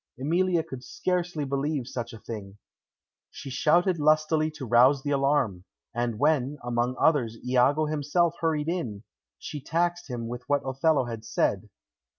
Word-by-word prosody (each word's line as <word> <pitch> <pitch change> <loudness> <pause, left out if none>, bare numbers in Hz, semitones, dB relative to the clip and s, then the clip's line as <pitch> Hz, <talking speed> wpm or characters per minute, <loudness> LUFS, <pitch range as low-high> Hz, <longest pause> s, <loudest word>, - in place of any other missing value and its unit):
Emilia 170 +4 +1
could 130 -4 -9
scarcely 175 -1 -2
believe 140 0 -1
such 120 -2 -5
a 115 - -9
thing. 105 -3 -8 0.7
She 135 - -9
shouted 170 +6 +2
lustily 155 +1 +3
to 135 - -6
rouse 125 +4 +5
the 145 - -2
alarm, 135 -10 +1 0.3
and 120 -2 -1
when, 145 0 +1
among 120 +1 -1
others, 125 -8 +2
Iago 130 +5 +3
himself 155 +3 +1
hurried 155 -2 0
in, 125 - -3 0.3
she 145 - -7
taxed 175 +3 -1
him 120 -2 -4
with 120 +1 -5
what 145 0 +1
Othello 135 +1 +2
had 115 -2 -6
said. - - -1
140 Hz, 150 wpm, -27 LUFS, 120-155 Hz, 0.7 s, rouse